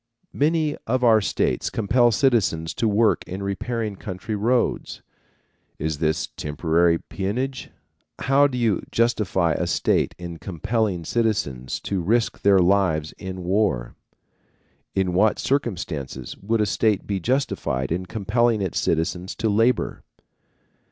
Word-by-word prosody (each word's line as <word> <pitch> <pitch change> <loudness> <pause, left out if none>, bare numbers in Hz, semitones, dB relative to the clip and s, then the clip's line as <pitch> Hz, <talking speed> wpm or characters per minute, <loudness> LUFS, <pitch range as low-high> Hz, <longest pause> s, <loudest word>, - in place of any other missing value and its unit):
Many 155 0 +1
of 125 +2 0
our 110 -2 +6
states - - 0
compel 120 +3 +3
citizens 105 - +1
to 115 - 0
work 110 +1 +2
in 95 +2 -5
repairing 105 +1 -3
country 95 +3 -6
roads. 120 +4 0 0.7
Is 75 -1 -3
this 80 -1 0
temporary 85 +3 +1
peonage? 125 +10 -4 0.5
How 140 +2 +4
do 130 -3 -5
you 115 -6 +1
justify 100 -7 +1
a - - -1
state - - +1
in 85 -2 -7
compelling 100 -1 -2
citizens 75 - -1
to 95 -2 -2
risk 110 +7 0
their 100 -1 +5
lives 90 -5 +2
in 95 -2 -6
war? 90 - 0 1.0
In 95 -2 +1
what 105 +4 +3
circumstances 85 - -3
would 110 +2 0
a - - +3
state 105 0 +1
be 100 -2 -2
justified 95 - -1
in 90 +2 -2
compelling 110 +3 +1
its 95 -4 -1
citizens 90 +3 -1
to 110 - 0
labor? 115 +4 +1
100 Hz, 130 wpm, -23 LUFS, 85-115 Hz, 1.0 s, our